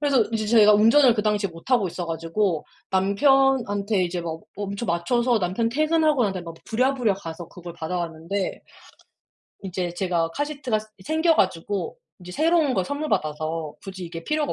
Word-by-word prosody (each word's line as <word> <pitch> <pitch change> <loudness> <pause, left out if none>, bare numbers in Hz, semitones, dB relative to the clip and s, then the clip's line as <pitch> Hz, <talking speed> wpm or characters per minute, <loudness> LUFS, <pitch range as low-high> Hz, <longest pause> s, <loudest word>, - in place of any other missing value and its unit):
그래서 280 -5 +3
인제 220 -2 -1
제가 210 -2 +6
운전을 230 +4 +6
그 210 - -1
당시에 210 -1 +1
못하고 195 +6 0
있어 175 +1 -5
가지고 165 +1 -1 0.2
남편한테 205 -1 +2
이제 175 0 -3
막 165 -1 -5
엄청 200 +3 -4
맞춰서 235 +8 +1
남편 190 +5 0
퇴근하고 310 -1 +2
난 200 - 0
다음에 180 -2 -5
막 165 -1 -8
부랴부랴 250 -2 +1
가서 170 -3 -8
그걸 175 -1 -10
받아 170 +1 -4
왔는데 170 +3 -3 1.0
이제 180 -2 -3
제가 175 -3 0
카시트가 275 - -2 0.2
이 - - -15
생겨 320 - +2
가지고 185 0 -1 0.2
인제 180 0 -10
새로운 320 - +2
걸 190 -6 0
선물 290 +7 -3
받아서 155 +1 -2
굳이 190 -2 -7
이게 165 0 -8
필요가 305 -1 0
200 Hz, 370 characters per minute, -24 LUFS, 175-255 Hz, 1.0 s, 제가